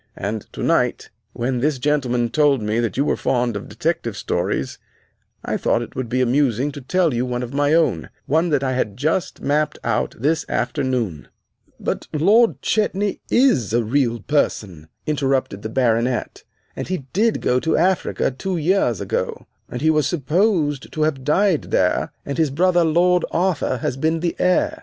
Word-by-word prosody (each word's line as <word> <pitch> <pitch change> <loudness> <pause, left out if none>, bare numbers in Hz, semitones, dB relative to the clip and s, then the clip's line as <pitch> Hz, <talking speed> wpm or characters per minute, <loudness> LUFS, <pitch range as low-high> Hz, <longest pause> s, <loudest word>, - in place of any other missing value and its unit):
And 105 +2 -4
tonight, - - 0 0.2
when 125 +1 -1
this 145 +2 +1
gentleman 125 -4 0
told 145 +1 +3
me 105 +1 -1
that 115 0 -2
you 140 - +2
were - - +1
fond 120 -3 0
of 105 - -6
detective - - -2
stories, - - -2 0.7
I - - -1
thought - - +1
it - - -11
would 130 -3 -4
be 130 +2 0
amusing 130 +1 +1
to 145 - -9
tell 170 +3 +1
you 120 +1 0
one 125 -1 -2
of 125 +2 -7
my 145 +2 +2
own 120 - +1 0.2
one 160 +4 +1
I 130 - 0
had 105 -6 -2
just 160 +5 -1
mapped 150 +2 0
out - - -1
this 145 +5 +1
afternoon." 120 - -2 0.5
"But - - -3
Lord 210 +10 +3
Chetney 205 -2 0
is 190 - +3
a 120 0 +2
real 120 -1 0
person," 100 - -1 0.2
interrupted 135 -8 -1
the 110 - -5
Baronet, 120 0 0 0.3
"and - - -5
he 180 -7 -3
did 220 +4 +2
go 125 0 +1
to 160 +4 0
Africa 180 -5 +1
two 180 +8 -3
years 160 - +1
ago, - - -3 0.2
and 125 +3 -5
he 160 - +4
was 150 -3 +2
supposed 155 - 0
to 155 - 0
have 145 -4 -1
died 180 +3 +2
there, - - +1
and 140 +3 -4
his 160 -2 +3
brother, 175 +4 +3
Lord 175 +2 +3
Arthur, 170 -6 0
has 125 - -3
been 160 +3 0
the 170 -1 -1
heir. 180 0 +1
140 Hz, 170 wpm, -21 LUFS, 120-165 Hz, 0.7 s, he